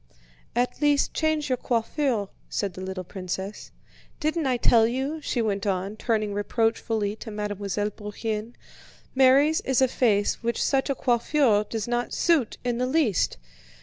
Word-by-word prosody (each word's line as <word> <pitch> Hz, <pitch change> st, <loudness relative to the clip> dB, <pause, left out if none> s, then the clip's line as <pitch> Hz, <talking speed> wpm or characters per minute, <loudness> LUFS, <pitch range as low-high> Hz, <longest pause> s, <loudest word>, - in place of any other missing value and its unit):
"At 245 Hz, +4 st, 0 dB
least, 290 Hz, -1 st, +3 dB
change 315 Hz, -2 st, 0 dB
your 255 Hz, -3 st, 0 dB
coiffure," 235 Hz, -2 st, 0 dB, 0.2 s
said 200 Hz, -3 st, -2 dB
the 185 Hz, -, -8 dB
little 185 Hz, 0 st, -4 dB
princess. 190 Hz, +2 st, -6 dB, 0.5 s
"Didn't 310 Hz, -1 st, 0 dB
I 255 Hz, -1 st, +2 dB
tell 230 Hz, -1 st, +4 dB
you," 270 Hz, +6 st, -2 dB
she 245 Hz, -5 st, -1 dB
went 200 Hz, -2 st, -1 dB
on, 195 Hz, +1 st, -1 dB
turning 215 Hz, -2 st, -1 dB
reproachfully 220 Hz, 0 st, 0 dB
to 225 Hz, -, -8 dB
Mademoiselle 205 Hz, -1 st, -2 dB
Bourienne, 215 Hz, +2 st, -5 dB, 0.6 s
"Mary's 270 Hz, +4 st, +5 dB
is 265 Hz, -2 st, +1 dB
a 260 Hz, -, +5 dB
face 210 Hz, -5 st, +1 dB
which 235 Hz, -1 st, -1 dB
such 270 Hz, 0 st, +1 dB
a 275 Hz, -, +1 dB
coiffure 240 Hz, -3 st, +2 dB
does 220 Hz, 0 st, -4 dB
not 240 Hz, 0 st, -1 dB
suit 320 Hz, -9 st, +2 dB
in 245 Hz, -1 st, -1 dB
the 250 Hz, -, +1 dB
least. 260 Hz, -, +1 dB
230 Hz, 150 wpm, -26 LUFS, 205-265 Hz, 0.6 s, Mary's